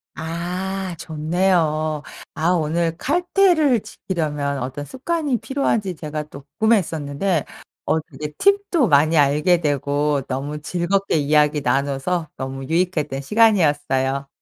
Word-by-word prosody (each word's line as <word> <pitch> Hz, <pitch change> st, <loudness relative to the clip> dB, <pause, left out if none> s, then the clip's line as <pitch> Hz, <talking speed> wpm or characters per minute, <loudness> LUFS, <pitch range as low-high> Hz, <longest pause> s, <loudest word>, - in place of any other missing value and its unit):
아. 170 Hz, +4 st, -4 dB, 0.4 s
좋네요. 155 Hz, -2 st, 0 dB, 0.3 s
아 160 Hz, +2 st, +1 dB
오늘 165 Hz, 0 st, 0 dB
칼퇴를 345 Hz, -, +3 dB
지키려면 150 Hz, -8 st, -3 dB
어떤 135 Hz, +3 st, -5 dB
습관이 290 Hz, -, -1 dB
필요한지 230 Hz, -9 st, -1 dB
제가 155 Hz, -1 st, -5 dB
또 140 Hz, -, -10 dB, 0.2 s
궁금했었는데 170 Hz, -6 st, +1 dB, 0.4 s
어 160 Hz, -, +2 dB
되게 150 Hz, 0 st, -8 dB
팁도 395 Hz, -, +3 dB
많이 155 Hz, +2 st, +4 dB
알게 150 Hz, +5 st, +3 dB
되고 145 Hz, 0 st, 0 dB
너무 145 Hz, +3 st, -4 dB
즐겁게 180 Hz, +5 st, 0 dB
이야기 150 Hz, 0 st, +3 dB
나눠서 140 Hz, +4 st, -1 dB
너무 135 Hz, 0 st, -5 dB
유익했던 160 Hz, -4 st, -1 dB
시간이었어요. 145 Hz, -9 st, +2 dB
155 Hz, 275 characters per minute, -21 LUFS, 145-190 Hz, 0.4 s, 많이